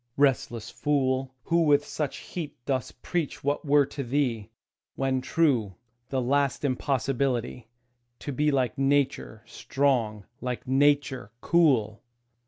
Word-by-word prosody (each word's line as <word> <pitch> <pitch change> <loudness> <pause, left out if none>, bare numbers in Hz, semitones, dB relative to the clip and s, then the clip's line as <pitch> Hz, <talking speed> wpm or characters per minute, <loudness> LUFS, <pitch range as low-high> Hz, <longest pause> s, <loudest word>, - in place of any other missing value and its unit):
Restless 120 -4 +1
fool, 130 -2 0
Who 170 0 +2
with 145 -2 +4
such 150 -3 -3 0.2
heat 165 -5 -5
dost 130 -2 -3
preach 170 -5 -2
what 145 +1 0
were 145 -1 +4
to 140 - -6
thee, 120 -5 -1 0.5
When 135 -1 0
true, 125 - +1 0.3
the 135 - 0
last 140 +2 +1
impossibility 130 -3 -1 0.5
To 145 - -6
be 150 +3 +1
like 135 -1 0
Nature 135 -5 0
strong, 120 -7 -1 0.2
like 125 -1 -4
Nature 135 -4 +2
cool! 125 -13 +2
135 Hz, 120 wpm, -27 LUFS, 125-145 Hz, 0.5 s, with